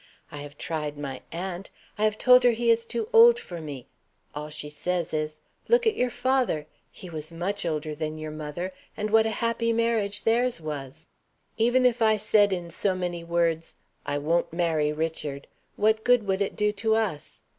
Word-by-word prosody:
I - - -8
have 145 0 -9
tried 150 -2 -4
my 135 -3 -5
aunt; 180 +2 -5 0.3
I 215 - +1
have 215 0 +1
told 250 +1 +6
her 245 -1 +5
he 235 +1 +2
is 230 0 +2
too 230 -2 -3
old 465 +1 +8
for 175 - -8
me. 140 -5 -7 0.5
All 150 +1 -6
she 150 -1 -5
says 170 +3 -3
is, 155 0 -3 0.3
'Look 475 0 +4
at 445 -1 +3
your 250 - +1
father; 255 - 0 0.3
he 185 - -10
was 155 -1 -6
much 180 +3 -2
older 155 -1 -2
than 155 +1 -4
your 155 0 -6
mother, 155 +5 -5 0.2
and 210 -1 -2
what 220 0 +5
a 220 - -3
happy 230 0 +1
marriage 225 -3 0
theirs 235 -1 +2
was.' 145 -4 -7 0.5
Even 245 +3 +3
if 245 -1 +2
I 220 -1 +4
said 205 -1 +3
in 175 -2 -3
so 190 +2 0
many 175 -2 -3
words, 170 -1 0 0.3
'I 145 0 0
won't 165 +4 0
marry 160 -3 +1
Richard,' 150 -3 -4 0.3
what 220 +1 +2
good 245 -2 +4
would 195 0 0
it 200 - -1
do 210 -1 +1
to 220 +2 0
us? 205 -10 -3
180 Hz, 190 wpm, -26 LUFS, 155-225 Hz, 0.5 s, old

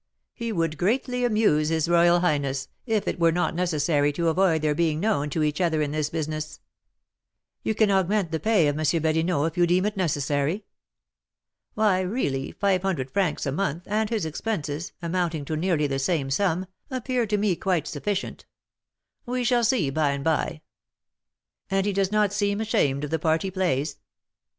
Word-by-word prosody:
He 230 -1 -4
would 165 -5 -1
greatly 250 +5 0
amuse 210 -10 +2
his 160 -1 +1
royal 175 0 +4
highness, 140 -5 0 0.2
if 220 -3 0
it - - -2
were 165 -1 +4
not 175 +2 0
necessary 155 -4 +1
to 165 +3 +1
avoid 165 -2 +2
their 150 -1 +2
being 155 -1 0
known 180 -7 0
to 155 +2 -1
each 150 +3 0
other 165 -3 +1
in 150 -1 0
this 155 -1 -1
business." 155 -1 -4 1.0
"You 220 - -1
can 215 -1 +3
augment 190 -1 +1
the 160 - -1
pay 210 -7 +3
of 145 +1 -1
M. - - -1 0.2
Badinot 160 0 +1
if 165 +1 -3
you 175 - +5
deem 180 +3 +2
it 210 0 -1
necessary." 150 +1 -1 1.1
"Why, 210 -4 +3
really, 180 - -2
five 195 -3 +1
hundred 160 -9 -2
francs 195 -5 0
a 140 - -1
month, 170 +1 -2
and 215 +1 0
his 220 -7 -1
expenses, 160 -2 -3
amounting 170 -3 -1
to 155 - -3
nearly 160 -2 +1
the 135 -1 -1
same 135 -2 0
sum, 185 +3 +1 0.2
appear 255 -2 -1
to 210 0 +1
me 200 -3 +1
quite 175 -4 0
sufficient; 195 +7 -4 0.8
we 250 0 -1
shall 240 0 +2
see 215 - +2
by 145 -1 +1
and 140 0 -4
by." 160 0 0 1.1
"And 195 +1 +1
does 195 0 +2
he - - -20
not 210 -2 +2
seem 205 0 0
ashamed 145 -11 +1
of 150 - -4
the 160 - 0
part 160 0 +1
he 190 - -3
plays?" 175 -7 -1
170 Hz, 180 wpm, -25 LUFS, 150-200 Hz, 1.1 s, you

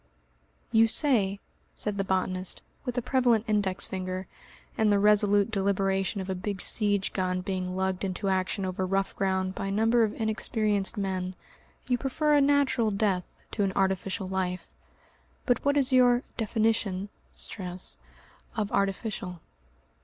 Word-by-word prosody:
"You 225 -1 +6
say," 215 -7 +2 0.4
said 205 -1 -2
the - - +2
botanist, 185 -1 -2 0.2
with 250 -1 -3
a 245 - 0
prevalent 245 -4 +2
index 205 -3 +1
finger, 185 0 -4 0.5
and 215 -1 +3
the 205 - +4
resolute 205 0 +4
deliberation 195 0 0
of 190 - -4
a 190 - -1
big 195 +1 -4
siege 205 -2 0
gun 185 -1 -1
being 185 -1 -3
lugged 190 0 -1
into 195 +1 -2
action 190 +1 0
over 185 0 -2
rough 195 +1 0
ground 190 -1 0
by 195 - -4
a - - -2
number 225 +3 +3
of 215 +1 -2
inexperienced 215 -2 0
men, 185 -2 -2 0.5
"you 245 -1 +1
prefer 300 +4 +1
a 290 - +5
natural 275 -5 +3
death 200 -3 -1
to 205 - 0
an 195 -1 0
artificial 190 0 0
life. 185 -1 -3 0.7
But 245 - +1
what 285 +1 +2
is 270 -2 +3
your 250 -1 +5
definition 220 -3 0 0.2
(stress) 180 -2 -6 0.6
of 215 -2 -1
artificial? 195 -2 -2
200 Hz, 145 wpm, -28 LUFS, 190-225 Hz, 0.7 s, You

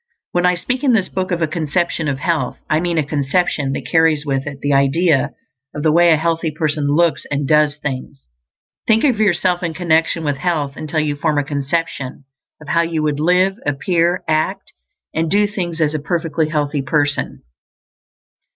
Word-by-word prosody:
When 175 0 +2
I 180 - +3
speak 250 +10 -3
in 265 -4 +4
this 205 -5 +1
book 185 -1 -3
of 175 -2 -1
a - - +2
conception 160 +1 -1
of 140 -2 -1
health, 150 -3 -1
I 155 - +3
mean 170 0 -1
a 155 - +1
conception 145 0 0
that - - -5
carries 160 -2 +2
with 135 -1 -1
it 140 -2 -6
the 145 0 0
idea 140 +2 +3 0.5
of 150 - -4
the 155 - +4
way 170 +2 +5
a 160 - +5
healthy 165 +1 0
person 150 -1 -1
looks 170 0 +2
and 140 -1 -1
does 150 -1 +3
things. 140 -1 -6 0.6
Think 225 0 +3
of 255 -7 +2
yourself 180 -3 +2
in 170 -2 -3
connection 165 -1 +1
with 145 -2 -1
health 150 -3 -1
until 155 +1 -3
you 150 -1 -1
form 150 0 0
a 145 - +2
conception 140 -1 -3 0.4
of 150 - -12
how 170 - +3
you 165 -2 -1
would 150 -1 0
live, 180 +4 +2
appear, 170 +5 0
act, 155 0 -1 0.4
and 160 0 0
do 205 +3 +3
things 180 -5 -4
as 155 -1 +1
a 155 - -1
perfectly 160 0 -1
healthy 145 -2 -1
person. 145 0 -1
160 Hz, 190 wpm, -18 LUFS, 145-175 Hz, 0.6 s, way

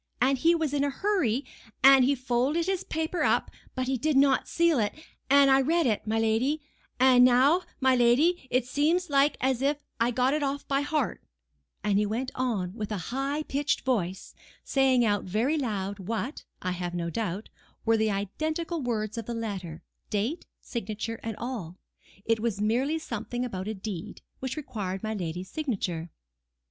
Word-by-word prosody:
And 265 +2 +3
he 335 +5 +4
was 315 -4 -1
in 285 -1 +1
a 285 - +1
hurry, 280 - 0 0.4
and 270 -1 +8
he 280 +3 +3
folded 260 +6 0
his 380 0 -1
paper 320 +1 -2
up, - - +2 0.2
but 255 - -1
he 260 -1 -1
did 305 +2 +1
not 275 -1 +4
seal 335 -5 +2
it; 205 -2 0 0.4
and 280 0 +6
I 265 0 +6
read 330 +4 +2
it, 220 -3 0
my 220 +1 +1
lady; 225 +7 +1 0.4
and 255 -1 +7
now, 260 +8 +5 0.2
my 260 -1 +4
lady, 260 +7 +3
it 255 -1 +1
seems 310 +6 +1
like 280 +1 +3
as 260 -1 +1
if 290 +1 0
I 230 - +3
had 240 -1 -1
got 255 +2 +3
it 305 - 0
off 280 0 -2
by 275 0 +1
heart;" 290 -3 -1 0.6
and 205 -1 +2
he 210 - +1
went 245 +5 -2
on 215 -8 -1
with 215 -1 -5
a 210 - -1 0.2
high 280 +3 -1
pitched 290 0 -1
voice, 190 -8 -2 0.3
saying 265 -3 +3
out 205 -2 +1
very 220 - +1
loud 200 -6 -3
what, 225 - -4 0.2
I 185 - -1
have 175 -1 -4
no 170 -1 -2
doubt, 210 -1 -3 0.4
were 225 0 +4
the 220 0 +2
identical 310 - -2
words 225 -2 -2
of 225 - -7
the 235 - -3
letter, 190 -8 -5 0.3
date, 220 - -2
signature 225 0 -4
and 225 -2 -5
all: 210 -8 -5 0.5
it 225 -1 +2
was 220 -3 -1
merely 250 +9 +1
something 245 -3 -4
about 190 -5 -5
a 220 - -3
deed, 205 0 -7 0.2
which 260 +2 -4
required 200 -9 -4
my 220 0 -2
lady's 180 -2 -5
signature. 190 - -3
245 Hz, 180 wpm, -28 LUFS, 215-280 Hz, 0.6 s, and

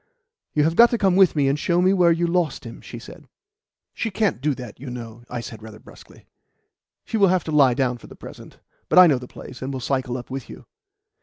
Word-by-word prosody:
"You 150 - +3
have 165 +2 +1
got 235 +4 +7
to 235 - 0
come 195 -4 +2
with 190 -3 +5
me 145 -2 +2
and 140 +2 0
show 175 +3 +1
me 185 +1 +3
whore 175 -3 +3
you 175 - 0
lost 170 -4 -1
him," 115 -1 -10
she - - -10
said. - - -13 0.7
"She 225 - -3
can't 195 - -1
do 145 -1 0
that, 125 -5 -10
you 135 0 -8
know," 120 -2 -8
I 120 -1 -4
said 115 -1 -9
rather 110 -1 -11
brusquely. - - -17 0.8
"She 225 - -3
will 200 -2 +5
have 185 -1 +1
to 160 - -5
lie 140 -5 +4
down 125 -2 -1
for - - -14
the - - -13
present. - - -12 0.3
But - - +1
I 185 - +10
know 145 -7 +3
the 125 - -10
place, 125 - -12
and 135 +1 -4
will 135 - -4
cycle 130 0 -2
up 125 +1 -10
with 135 -1 -6
you." - - -12
140 Hz, 245 wpm, -22 LUFS, 125-180 Hz, 0.8 s, I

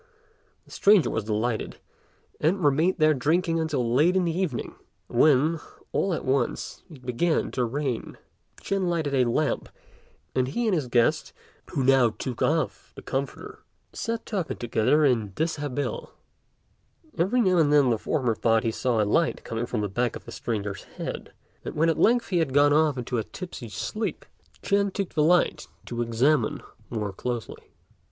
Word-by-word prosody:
The - - -20
stranger 200 -4 +4
was 110 - -2
delighted, 110 +2 -2 0.6
and 175 +4 +1
remained 155 +6 +3
there 155 -1 +4
drinking 165 +5 +1
until 140 -7 -1
late 160 +8 +4
in 185 -1 +2
the 165 -1 -1
evening, 180 -9 -2 0.3
when, 150 +5 +3 0.3
all 190 -3 0
at - - -6
once, 130 -2 -1
it 135 -6 -14
began 155 +7 0
to 125 - -1
rain. 130 0 -3 0.4
Ch'ên 195 -2 -1
lighted 160 -5 -1
a 125 -3 +3
lamp; 150 +5 0 0.6
and 130 -1 +1
he 235 - -2
and 215 - +2
his 150 -7 0
guest, 120 -1 +1 0.4
who 135 - -1
now 130 -2 +5
took 125 +2 -6
off - - -1
the - - -10
comforter, 135 +1 -4 0.3
sat 230 -1 -3
talking 195 -7 -3
together 120 +6 +2
in 115 -7 +1
dishabille. 145 -4 -2 1.1
Every 195 +9 +1
now 185 -6 +3
and 150 -3 +3
again 145 -4 +5
the 115 - 0
former 130 -7 0
thought 115 +1 +2
he 115 - 0
saw 115 -1 +1
a - - 0
light 165 +10 +1
coming 115 +1 -3
from 115 -4 -2
the 105 - -1
back 120 +4 -1
of - - -9
the - - -9
stranger's 100 -4 -4 0.2
head; - - -5 0.3
and - - -6
when 165 +2 +3
at 165 - 0
length 240 +2 +3
he 180 -3 +1
had 140 -5 -1
gone 145 0 +5
off 150 -2 +3
into 125 -1 -2
a - - -1
tipsy 160 - -8
sleep, 215 - -4 0.4
Ch'ên 200 0 +2
took 195 -1 -3
the 155 - +1
light 175 +3 +2 0.2
to 120 0 -4
examine 120 +2 +1 0.3
more 105 -4 -3
closely. 120 +3 -5
140 Hz, 170 wpm, -26 LUFS, 120-165 Hz, 1.1 s, now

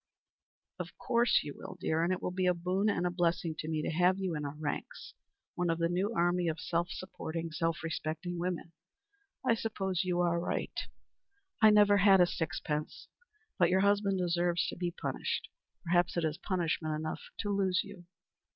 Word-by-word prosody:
"Of - - -6
course 240 -1 +3
you 145 - -6
will, 185 - -9
dear; 160 -1 +1
and 175 - +1
it 185 - -2
will - - -1
be 185 0 0
a 180 - +3
boon 185 +4 0
and 180 -3 0
a 175 - +1
blessing 170 -2 0
to 155 - -4
me 155 -1 -1
to - - -1
have 180 +3 +3
you 190 -3 -2
in 150 -1 -3
our 140 +1 -5
ranks 150 -1 -5 0.4
one 175 -1 -1
of 165 - +1
the 170 0 +1
new 185 +5 0
army 175 0 +2
of 160 0 -1
self 170 +1 -1
supporting, 165 -3 -5
self 165 -1 -1
respecting 165 +2 -3
women. 175 -1 -3 0.7
I 240 - +5
suppose 195 -5 -1
you 180 -1 0
are 170 -1 +2
right. 170 - -2 0.9
I 220 - +9
have 210 - +6
never 205 -1 +6
had 195 -1 +6
a 180 - +7
sixpence. 155 -2 -3 0.5
But 175 -2 +5
your 190 +1 +3
husband 200 -1 +3
deserves 175 -1 +1
to - - -5
be 175 0 -1
punished. 175 - -3 0.4
Perhaps 175 0 +2
it 170 - +1
is 155 -1 -2
punishment 165 -4 -1
enough 155 +1 -4 0.2
to 205 - -2
lose 190 -2 +2
you." 200 -3 -12
175 Hz, 190 wpm, -32 LUFS, 165-185 Hz, 0.9 s, I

